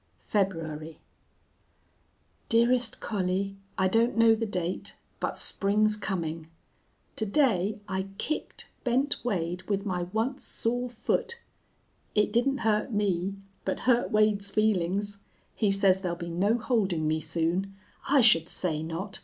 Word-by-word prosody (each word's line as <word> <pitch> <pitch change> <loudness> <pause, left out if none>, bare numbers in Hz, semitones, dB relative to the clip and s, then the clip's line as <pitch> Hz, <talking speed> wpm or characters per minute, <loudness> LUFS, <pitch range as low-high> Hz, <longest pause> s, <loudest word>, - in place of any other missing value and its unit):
"February. 165 -6 -2 1.5
"DEAREST 235 0 +2
COLLIE, 195 -1 -1 0.2
I 190 - +3
don't 230 +4 +2
know 230 0 +6
the 225 0 -1
date, 180 -3 -3 0.2
but - - -2
spring's 210 +2 +3
coming. 165 -6 -4 0.7
To 220 - 0
day 210 -5 +2
I 190 -1 -2
kicked 310 - -4 0.2
Bent 265 +3 +2
Wade 180 -6 -2
with 200 0 0
my 180 -3 -1
once 240 +6 -1
sore 245 +2 -1
foot. 465 - -2 0.8
It 210 0 +2
didn't 270 +4 +2
hurt 215 +1 +1
me, 195 -2 0 0.3
but 190 - -2
hurt 245 -1 +2
Wade's 210 -2 +2
feelings. 200 -1 0 0.3
He 210 - +1
says 195 -1 +3
there'll 175 -3 -2
be 170 0 -6
no 200 +7 +2
holding 200 -10 0
me 155 +1 +1
soon. 170 +5 -1 0.3
I 280 -1 +6
should 170 -8 +5
say 160 -4 0
not. 165 +5 -5
200 Hz, 130 wpm, -28 LUFS, 180-225 Hz, 1.5 s, know